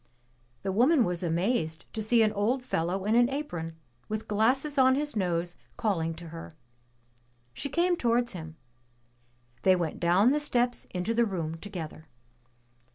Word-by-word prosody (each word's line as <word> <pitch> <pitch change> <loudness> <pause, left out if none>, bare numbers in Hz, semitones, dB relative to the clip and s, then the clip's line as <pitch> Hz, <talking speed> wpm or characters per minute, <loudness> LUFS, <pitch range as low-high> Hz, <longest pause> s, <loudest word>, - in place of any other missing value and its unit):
'' 120 0 -38
The 195 - -1
woman 250 - +4
was 175 -1 -2
amazed 170 -1 0
to 220 - -3
see 225 +2 +4
an 215 -1 +2
old 230 +6 0
fellow 185 -3 -1
in 215 - +2
an 240 +1 +5
apron, 175 - -4 0.3
with 215 0 -3
glasses 265 +7 +2
on 260 0 +6
his 295 0 -2
nose 175 -3 -1 0.2
calling 165 -7 0
to 165 0 -10
her. 165 0 -9 1.0
She 280 - -4
came 350 +4 +2
towards 240 -4 +1
him. 160 -4 -8 1.1
They 185 +6 +5
went 170 -4 -2
down 180 +8 +4
the 295 - +2
steps 245 -4 0
into 180 +5 -2
the 235 +1 +3
room 165 -5 -3
together. 165 -4 -7
205 Hz, 160 wpm, -28 LUFS, 170-245 Hz, 1.1 s, on